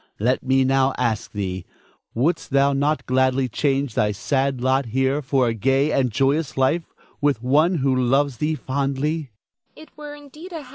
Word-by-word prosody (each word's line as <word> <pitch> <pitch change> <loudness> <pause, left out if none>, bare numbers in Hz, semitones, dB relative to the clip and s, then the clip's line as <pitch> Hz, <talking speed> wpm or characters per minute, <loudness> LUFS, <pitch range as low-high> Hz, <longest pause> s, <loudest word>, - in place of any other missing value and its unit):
Let 125 +5 +1
me 135 0 +2
now 135 0 +2
ask 115 -4 -1
thee, 95 -3 -4 0.5
Wouldst 160 +8 0
thou 140 +1 +3
not 145 +3 0
gladly 130 0 +1
change 135 0 -1
thy 105 -1 +1
sad 135 +5 -1
lot 130 +1 +1
here 130 +5 0
for 135 -2 +1
a 115 - 0
gay 135 +6 +1
and 130 -3 +1
joyous 135 +4 0
life 145 +6 0 0.3
with 140 -5 +1
one 155 +8 +3
who 135 -4 +1
loves 130 +1 +1
thee 155 +4 -1
fondly? 140 +2 -2
135 Hz, 145 wpm, -22 LUFS, 125-140 Hz, 0.5 s, thou